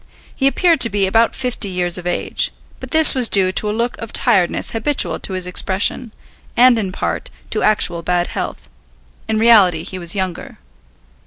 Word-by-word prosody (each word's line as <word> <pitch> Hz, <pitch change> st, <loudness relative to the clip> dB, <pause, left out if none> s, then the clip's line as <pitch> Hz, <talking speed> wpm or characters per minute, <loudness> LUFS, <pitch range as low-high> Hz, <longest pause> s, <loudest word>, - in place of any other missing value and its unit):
He 270 Hz, -, +1 dB
appeared 335 Hz, +3 st, +1 dB
to 230 Hz, -, +6 dB
be 200 Hz, -2 st, 0 dB
about 225 Hz, +4 st, +1 dB
fifty 250 Hz, -5 st, -2 dB
years 180 Hz, -1 st, -2 dB
of 175 Hz, -, -8 dB
age, 175 Hz, -, -2 dB, 0.3 s
but -, -, -10 dB
this 320 Hz, -1 st, +7 dB
was 250 Hz, -3 st, +2 dB
due 190 Hz, -2 st, +4 dB
to 210 Hz, +2 st, -1 dB
a -, -, -1 dB
look 235 Hz, +3 st, -2 dB
of 230 Hz, -, -8 dB
tiredness 180 Hz, -3 st, 0 dB
habitual 265 Hz, +5 st, -1 dB
to 190 Hz, -, -5 dB
his 185 Hz, -1 st, -2 dB
expression, 195 Hz, +5 st, 0 dB, 0.5 s
and, 245 Hz, -1 st, +5 dB
in 195 Hz, -4 st, -4 dB
part, -, -, -4 dB, 0.2 s
to -, -, -2 dB
actual 180 Hz, -5 st, +1 dB
bad 175 Hz, +1 st, -1 dB
health. -, -, -6 dB, 0.6 s
In 220 Hz, -, -1 dB
reality 205 Hz, -8 st, +4 dB
he 185 Hz, -, -8 dB
was 170 Hz, +2 st, -1 dB
younger. 190 Hz, -3 st, -5 dB
205 Hz, 180 wpm, -17 LUFS, 180-235 Hz, 0.6 s, this